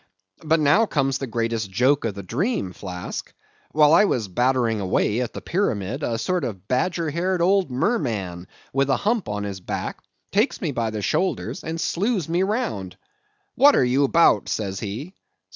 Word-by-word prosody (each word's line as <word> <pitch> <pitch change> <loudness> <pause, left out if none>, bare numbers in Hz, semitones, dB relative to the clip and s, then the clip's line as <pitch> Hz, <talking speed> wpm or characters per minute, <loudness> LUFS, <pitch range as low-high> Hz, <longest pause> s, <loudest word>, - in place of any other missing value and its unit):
But 160 +1 +2
now 175 +10 +4
comes 135 -5 0
the 135 - -4
greatest 115 -2 -2
joke 125 +7 +2
of 105 -4 -2
the 100 - -7
dream, 120 - -1
Flask. 90 -2 -6 0.4
While 150 0 +5
I 205 +5 +7
was 115 - 0
battering 120 +2 +1
away 105 +4 +1
at 125 - -3
the - - -7
pyramid, 130 - -1
a 115 -5 -1
sort 180 +7 -1
of 100 -6 -5
badger 160 +5 0
haired 180 +3 0
old 190 -1 +3
merman, 110 - -1 0.3
with 135 +1 +1
a 135 - +3
hump 220 - 0
on 105 0 -3
his 100 -2 -5
back, 90 - -4 0.3
takes 210 +7 +1
me 160 - -2
by 115 -4 -1
the 105 -1 -4
shoulders, 185 - -1
and 160 +1 -4
slews 190 +1 0
me 170 +2 +1
round. 190 - -2 0.6
'What 285 +3 +6
are - - +4
you 135 +3 +3
'bout?' 165 -9 +4
says 95 -3 -2
he. 115 - -6
135 Hz, 175 wpm, -23 LUFS, 105-175 Hz, 0.6 s, I